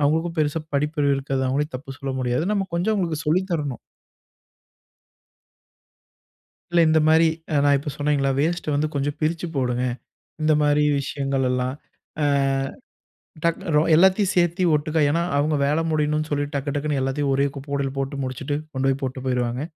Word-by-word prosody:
அவங்களுக்கும் 160 +4 +1
பெருசா 155 +1 0
படிப்பறிவு 145 0 +1
இருக்காது. 135 -1 -2
அவங்களையும் 140 +2 -1
தப்பு 135 0 -10
சொல்ல 135 -1 -4
முடியாது. 125 +4 0
நம்ம 195 -2 0
கொஞ்சம் 180 +6 +1
அவங்களுக்கு 165 -6 -2
சொல்லி 170 +5 +3
தரணும். 145 -6 -2 2.9
இல்ல. 175 - +3
இந்த 160 0 +4
மாரி, 160 +1 +5 0.3
அ - - +2
நான் 145 - +5
இப்ப 145 - -5
சொன்னேங்கல்ல, 145 -2 +1
வேஸ்ட்டு 160 0 0
வந்து 150 +2 +1
கொஞ்சம் 145 +1 -1
பிரிச்சு 165 +2 -1
போடுங்க. 125 -1 0 0.6
இந்த 155 0 +3
மாரி 150 0 +3 0.2
விஷயங்கள்லல்லாம், 130 -2 -1 0.5
அ - - +3 1.2
டக் 170 0 +1 0.2
ரோ 150 - +5
எல்லாத்தையும் 190 +3 +4
சேர்த்து 175 +1 +2
ஒட்டுக்க. 155 +2 -1
ஏன்னா, 170 +3 +1
அவங்க 150 +1 +1
வேலை 150 +3 +1
முடியணும்னு 155 0 0
சொல்லி 145 0 0
டக்கு, 140 0 -2
டக்குன்னு 145 -1 -1
எல்லாத்தையும் 135 +1 0
ஒரே 140 +1 +2
குப்பை 140 +1 -9
கூடையில 140 -1 -1
போட்டு 135 +1 -3
முடிச்சுட்டு, 130 +3 -3 0.2
கொண்டு 135 0 0
போய் 135 0 -1
போட்டு 130 0 -4
போயிருவாங்க. 125 0 -1
145 Hz, 155 wpm, -23 LUFS, 135-155 Hz, 2.9 s, மாரி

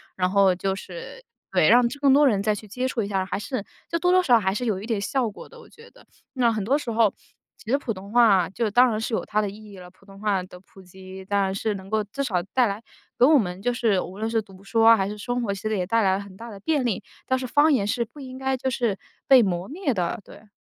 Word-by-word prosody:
然 185 0 0
后 195 -2 +4
就 190 +1 -1
是 190 - -9 0.3
对， - - +3
让 245 +1 +6 0.2
更 275 -2 +5
多 290 +2 +5
人 205 -6 +2
再 210 +1 +1
去 210 +1 -10
接 250 +5 -2
触 250 -3 -2
一 - - -4
下， 190 -2 -1
还 - - -3
是 215 -1 -4 0.2
就 335 - -1
多 360 +1 +2
多 370 0 +5
少 250 -8 +5
少 - - +5
还 190 -2 0
是 230 +5 -3
有 205 -5 -1
一 - - -7
点 225 -3 -1
效 245 +2 0
果 205 - -12
的 480 - -15
我 - - -15
觉 460 +1 -17
得。 - - -21 0.3
那 245 -3 +2
很 215 -2 -2
多 260 +8 +2
时 255 -6 -5
候 220 -2 +3 0.4
其 220 - -8
实 275 - +4
普 250 -5 -4
通 195 +1 -11
话 215 -7 +5
就 225 +3 -2
当 245 +4 +5
然 215 -2 -2
是 230 - -4
有 - - -1
它 215 0 0
的 205 - -2
意 210 +1 -12
义 195 - -12
了。 180 -1 -11
普 190 +1 -25
通 195 0 -15
话 200 -3 0
的 180 0 -13
普 190 +1 -18
及 190 +1 -12
当 200 +1 +1
然 190 -1 0
是 215 +2 -1
能 190 0 -10
够 220 0 0
至 210 +7 -5
少 185 -9 -1
带 255 -2 +4
来 205 +2 -5 0.3
给 245 - +6
我 300 +2 +6
们 180 -4 -3
就 245 +3 0
是 225 -5 +1
无 190 +3 -8
论 220 +1 -2
是 225 0 +1
读 195 -2 -17
书 225 +3 +1
啊 230 0 +8
还 195 -1 -1
是 210 - -6
生 245 +4 -3
活， 220 -4 -2
其 195 - -8
实 215 0 -1
也 180 - -1
带 230 +3 +2
来 190 -1 +3
了 - - -5
很 195 -1 -14
大 235 +2 -9
的 200 - -10
便 290 +4 0
利。 220 -6 -1 0.2
但 260 - +1
是 255 - -4
方 295 +4 +4
言 205 -7 +1
是 235 +3 0
不 270 +6 -16
应 260 -2 -9
该 265 0 -1
就 260 +1 -2
是 235 -5 -1 0.3
被 265 -2 +8
磨 180 -3 -1
灭 310 -2 -2
的， 180 +1 -2
对。 215 - -16
215 Hz, 315 characters per minute, -24 LUFS, 195-250 Hz, 0.4 s, 啊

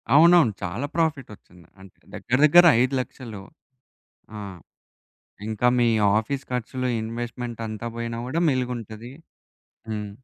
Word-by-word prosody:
అవునవును. 170 -6 +6
చాలా 110 +11 -3
ప్రాఫిటొచ్చింది. 130 - -4
అంటే 95 - -16 0.2
దగ్గర 130 - -1
దగ్గర 175 +4 +7 0.2
5,00,000. 125 -5 -3 0.9
ఆ! - - -6 1.1
ఇంకా 110 +3 +1
మీ 120 - +3 0.3
ఆఫీస్ 130 +5 -4
ఖర్చులు 125 +1 -3
ఇన్‌వెస్ట్మెంటంతా 115 -1 -5
బొయినా 115 0 -4
గూడా 160 +6 -2
మిలుగుంటది. 120 -3 -4 0.8
హ్మ్. 105 -1 -4
120 Hz, 100 wpm, -24 LUFS, 110-130 Hz, 1.1 s, దగ్గర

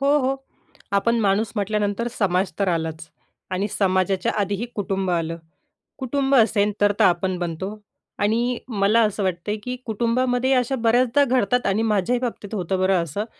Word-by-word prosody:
हो, 285 +2 +3
हो, 270 0 0 0.6
आपण 230 +4 +2
माणूस 205 +1 +1
म्हटल्यानंतर 210 +2 -1
समाज 190 -2 +1
तर 200 -2 +1
आलाच 160 -1 -2 0.4
आणि 190 +3 -1
समाजाच्या 185 -1 +1
आधीही 200 +3 -1
कुटुंब 195 -2 -2
आलं. 165 -1 -1 0.6
कुटुंब 270 +1 0
असेल, 215 -4 +3
तर-तर 205 +1 +3
आपण 185 0 +1
बनतो. 180 +5 -4 0.4
आणि 235 +4 +1
मला 215 -1 +2
असं 210 -1 -2
वाटतंय, 185 +3 -2
की 250 0 -3
कुटुंबामध्ये 245 +3 +1
अशा 255 +1 +1
बऱ्याचदा 245 +3 +3
घडतात 250 -2 +1
आणि 200 +3 +1
माझ्याही 215 +2 +1
बाबतीत 230 -4 -5
होतं 185 -1 -1
बरं 185 -2 +2
असं, 170 +7 -4
205 Hz, 150 wpm, -23 LUFS, 190-240 Hz, 0.6 s, हो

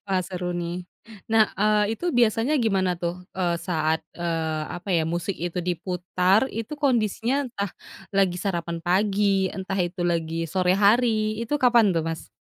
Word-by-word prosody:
Wah, 190 -1 +1
seru 180 0 -4
nih. 175 +1 -4 0.4
Nah, 220 -1 +3
eee, 210 +1 +2
itu 350 -6 -2
biasanya 235 +4 +3
gimana 190 -4 +1
tuh, 175 +1 -5
eee, 175 -2 0
saat, 160 -3 -1
eee, 165 -2 -2
apa 175 +3 -7
ya, 165 - +3
musik 170 +4 -2
itu 175 +1 -4
diputar 180 +4 +1
itu 230 +5 -6
kondisinya 250 0 +1
entah 200 -5 -3 0.4
lagi 190 -2 +2
sarapan 170 -3 -2
pagi, 195 +2 +2
entah 190 0 -5
itu 175 0 -2
lagi 165 -1 -1
sore 185 +3 +1
hari, 215 0 +3
itu 290 +6 -1
kapan 240 -6 +5
tuh 165 -2 -1
Mas? 165 -1 -5
185 Hz, 155 wpm, -25 LUFS, 175-215 Hz, 0.4 s, kapan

